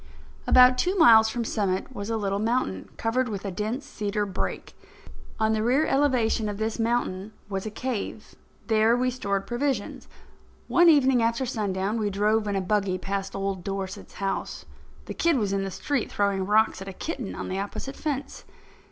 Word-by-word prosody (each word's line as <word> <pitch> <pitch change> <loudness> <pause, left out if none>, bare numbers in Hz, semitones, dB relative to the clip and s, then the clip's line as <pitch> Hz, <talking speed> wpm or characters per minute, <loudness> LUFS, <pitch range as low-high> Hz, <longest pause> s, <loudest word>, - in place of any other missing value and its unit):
About 250 0 +7
two 365 +2 +1
miles 225 -8 +7
from 235 +1 -3
Summit 200 +2 -1
was 200 +2 -5
a 225 - 0
little 200 -2 -1
mountain, 215 - -1
covered 245 +2 0
with 200 -2 -5
a 195 - -2
dense 220 +9 -3
cedar 210 -6 -2
brake. 190 -2 -4 0.7
On 220 0 +2
the 215 - 0
rear 255 +7 +2
elevation 250 -6 +1
of 205 - -5
this 220 +2 -2
mountain 220 -3 -1 0.2
was 195 +1 -3
a - - -2
cave. 220 -1 -5 0.3
There 220 +1 +3
we 255 +1 +1
stored 200 -6 -2
provisions. 240 -3 -2 0.6
One 345 0 +5
evening 265 -5 +5
after 230 +3 +1
sundown, 210 -2 -2
we 210 -1 0
drove 210 +2 +1
in 200 - -1
a 195 - 0
buggy 190 -1 0
past 195 +1 -4
old 195 -2 -3
Dorset's 195 +1 -5
house. 195 -1 -3 0.4
The - - -6
kid 335 -4 +2
was 205 -4 0
in 195 0 0
the 195 - -3
street, 260 +6 -2
throwing 195 -2 0
rocks 215 -1 +3
at 195 - -7
a 195 - -6
kitten 255 - -5
on - - -5
the 190 - -3
opposite 235 +7 -5
fence. 280 -3 -4
215 Hz, 180 wpm, -26 LUFS, 195-245 Hz, 0.7 s, About